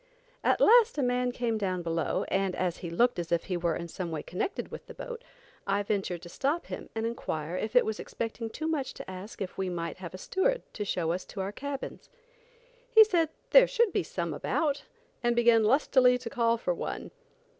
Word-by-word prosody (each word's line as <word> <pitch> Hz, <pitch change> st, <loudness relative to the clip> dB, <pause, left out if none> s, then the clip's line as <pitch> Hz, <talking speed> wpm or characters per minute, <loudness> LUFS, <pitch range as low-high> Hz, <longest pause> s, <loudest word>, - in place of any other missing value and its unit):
At -, -, +3 dB
last 470 Hz, -2 st, +6 dB
a 285 Hz, -, +1 dB
man 250 Hz, 0 st, +1 dB
came 235 Hz, -3 st, -1 dB
down 185 Hz, -3 st, -1 dB
below, 165 Hz, -2 st, -1 dB
and 195 Hz, -1 st, 0 dB
as 180 Hz, -2 st, -1 dB
he 175 Hz, -, -6 dB
looked 235 Hz, +6 st, +2 dB
as 170 Hz, -1 st, -4 dB
if 170 Hz, -1 st, +2 dB
he 185 Hz, -, -3 dB
was 170 Hz, -1 st, 0 dB
in 170 Hz, -, -5 dB
some 175 Hz, +1 st, -5 dB
way 160 Hz, -2 st, -4 dB
connected 180 Hz, -, -3 dB
with -, -, -8 dB
the -, -, -10 dB
boat, 485 Hz, -1 st, -7 dB, 0.4 s
I 200 Hz, +1 st, +1 dB
ventured 195 Hz, -4 st, -2 dB
to -, -, -8 dB
stop 285 Hz, -, -1 dB
him -, -, -7 dB
and 225 Hz, 0 st, -1 dB
inquire 165 Hz, -8 st, -3 dB
if 215 Hz, +5 st, -3 dB
it 245 Hz, -, +6 dB
was 220 Hz, -1 st, -2 dB
expecting 230 Hz, 0 st, -4 dB
too 310 Hz, +7 st, -5 dB
much 300 Hz, -5 st, -2 dB
to -, -, -8 dB
ask 190 Hz, +3 st, -6 dB
if 185 Hz, -, -8 dB
we 190 Hz, -1 st, 0 dB
might 170 Hz, -1 st, -4 dB
have 185 Hz, -1 st, -8 dB
a -, -, -6 dB
steward 480 Hz, -, 0 dB
to 210 Hz, -, -3 dB
show 170 Hz, -4 st, 0 dB
us 180 Hz, +2 st, -2 dB
to 195 Hz, -, -6 dB
our 190 Hz, +1 st, -2 dB
cabins. 280 Hz, +5 st, -6 dB, 0.8 s
He 445 Hz, -3 st, +9 dB
said 345 Hz, -7 st, +2 dB, 0.2 s
there -, -, +8 dB
should 470 Hz, -4 st, +2 dB
be -, -, +2 dB
some -, -, -3 dB
about, 290 Hz, -3 st, -1 dB, 0.4 s
and 240 Hz, -1 st, +2 dB
began 235 Hz, -1 st, +5 dB
lustily 250 Hz, 0 st, +4 dB
to 245 Hz, -2 st, -7 dB
call 235 Hz, -2 st, +2 dB
for -, -, -1 dB
one. -, -, -5 dB
225 Hz, 215 wpm, -29 LUFS, 185-275 Hz, 0.8 s, He